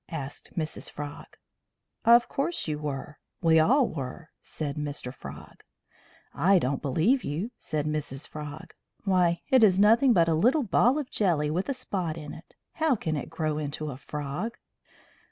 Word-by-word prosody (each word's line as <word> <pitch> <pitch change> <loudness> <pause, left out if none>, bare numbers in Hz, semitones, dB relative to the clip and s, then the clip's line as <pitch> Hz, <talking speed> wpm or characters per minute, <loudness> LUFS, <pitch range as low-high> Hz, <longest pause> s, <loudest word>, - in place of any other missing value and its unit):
asked 145 -1 -7
Mrs. 155 -1 -3
Frog. 145 -1 -7 0.8
"Of 235 +1 +7
course 320 - -2
you 150 -1 -2
were. 145 0 -5 0.2
We 160 -1 +6
all 250 - +4
were," 150 +3 -6
said 145 -3 -5
Mr. 145 -4 -4
Frog. 75 - -11 0.7
"I 185 +6 +4
don't 140 -4 0
believe 170 - +2
you," 170 - -3
said 155 -2 -2
Mrs. 150 -2 -3
Frog. 150 0 -8 0.3
"Why, 180 -3 +2
it 260 -3 +6
is 190 -3 +5
nothing 230 +6 +6
but 170 -7 +4
a 165 - +3
little 245 - +3
ball 245 +5 +3
of 290 -4 -4
jelly 160 -7 +1
with 180 - -1
a 275 - 0
spot 185 -10 -3
in 150 -2 -7
it. 165 - -14 0.2
How 315 -4 +2
can 160 -7 -2
it 145 - -4
grow 155 -2 -2
into 150 0 -4
a 125 - -8
frog?" 150 - -5
160 Hz, 165 wpm, -27 LUFS, 150-215 Hz, 0.8 s, Of